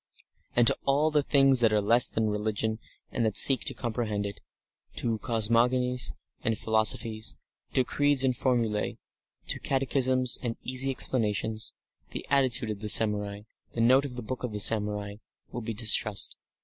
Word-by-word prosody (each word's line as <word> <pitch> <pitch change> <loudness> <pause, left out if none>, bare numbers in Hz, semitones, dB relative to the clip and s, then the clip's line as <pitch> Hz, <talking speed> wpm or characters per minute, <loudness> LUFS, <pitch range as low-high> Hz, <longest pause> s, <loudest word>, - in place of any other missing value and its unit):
And 120 - +3
to - - +5
all 145 +3 +1
the 150 -1 +2
things 135 -2 +3
that 115 -2 +2
are 105 - +2
less 115 +4 +5
than 110 -1 -2
religion 110 +1 -3 0.3
and 120 - -2
that 110 -3 0
seek 135 -4 +6
to - - 0
comprehend 110 -4 -4
it, 100 0 -7 0.6
to 115 -2 -3
cosmogonies 120 +3 0 0.3
and 115 -1 -2
philosophies, 110 0 0 0.4
to 130 - +2
creeds 145 +1 +1
and 130 -2 0
formulae, 115 -5 -2 0.5
to - - -3
catechisms 130 -2 +1
and 115 -2 -4
easy 130 +1 +1
explanations, 110 -4 -2 0.4
the - - -8
attitude 130 -5 +2
of 105 - -7
the 105 0 -3
samurai, 105 -2 +3 0.3
the 115 - -3
note 130 +4 +4
of 130 -3 -8
the 125 - -7
Book 125 +4 -6
of 110 -4 -5
Samurai, 105 -1 0 0.3
will 120 - -6
be 115 0 -6
distrust. 110 -1 +1
115 Hz, 160 wpm, -27 LUFS, 110-130 Hz, 0.6 s, seek